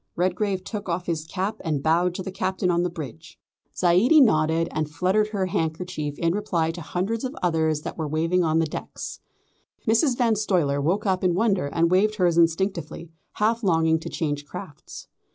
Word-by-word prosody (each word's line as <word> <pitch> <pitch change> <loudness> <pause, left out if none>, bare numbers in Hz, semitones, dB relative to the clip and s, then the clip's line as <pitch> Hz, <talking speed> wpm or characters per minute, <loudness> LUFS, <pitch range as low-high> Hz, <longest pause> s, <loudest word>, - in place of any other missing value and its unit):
Redgrave 185 +2 0
took 205 -1 -6
off 175 +1 -2
his 160 -2 -2
cap 195 +5 -3
and 150 -5 -1
bowed 175 +3 +2
to 185 - -4
the 190 - -5
Captain 185 -1 -1
on 170 0 +2
the 180 - 0
bridge. 160 0 -9 0.4
Zaidie 185 - +5
nodded 165 - +3
and 155 -1 -2
fluttered 185 +7 +1
her 200 -3 -1
handkerchief 160 -4 -3
in 165 0 +1
reply 170 -5 0
to 170 +1 -8
hundreds 195 - -2
of 260 +3 -4
others 160 -3 +1
that - - -7
were 160 - -1
waving 165 +4 +1
on 160 -1 +1
the 165 - +3
decks. 155 - -7 0.7
Mrs. 240 +3 +3
Van 235 -3 +3
Stuyler 175 -9 +1
woke 185 +9 0
up 190 -2 0
in 180 -2 +2
wonder 195 -6 +1
and 165 +3 +1
waved 210 +4 +3
hers 180 -4 +2
instinctively, 170 -1 0 0.2
half 225 +2 +1
longing 160 -5 +2
to - - -7
change 145 -3 -2
crafts. 170 -5 -9
175 Hz, 185 wpm, -24 LUFS, 160-195 Hz, 0.7 s, Zaidie